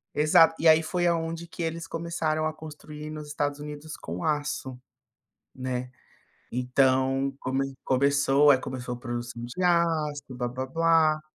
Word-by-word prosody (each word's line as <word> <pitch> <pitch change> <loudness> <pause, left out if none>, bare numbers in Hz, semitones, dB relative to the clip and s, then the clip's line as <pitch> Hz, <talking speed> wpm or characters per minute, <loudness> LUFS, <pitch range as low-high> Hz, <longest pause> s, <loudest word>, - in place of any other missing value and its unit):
Exato, 155 +2 +5
e 165 - +3
aí 160 0 +7
foi 175 +2 0
aonde 165 0 -1
que 170 - -6
eles 165 0 -3
começaram 160 -2 -2
a 155 - -1
construir 150 -1 -9
nos 155 -1 -7
Estados 145 -1 -2
Unidos 150 +1 -7
com 85 +2 -6
aço, 145 -4 -2 0.8
né. 125 -1 -4 0.6
Então 130 +2 +2
come 135 +1 -2
começou, 140 +2 +4
aí, 135 - +6
começou 130 -1 -5
a 120 - -9
produção 120 -1 -5
de 125 +10 -5
aço, 165 -4 +2
blá-blá-blá. 155 +6 +1
150 Hz, 135 wpm, -27 LUFS, 130-160 Hz, 0.8 s, aí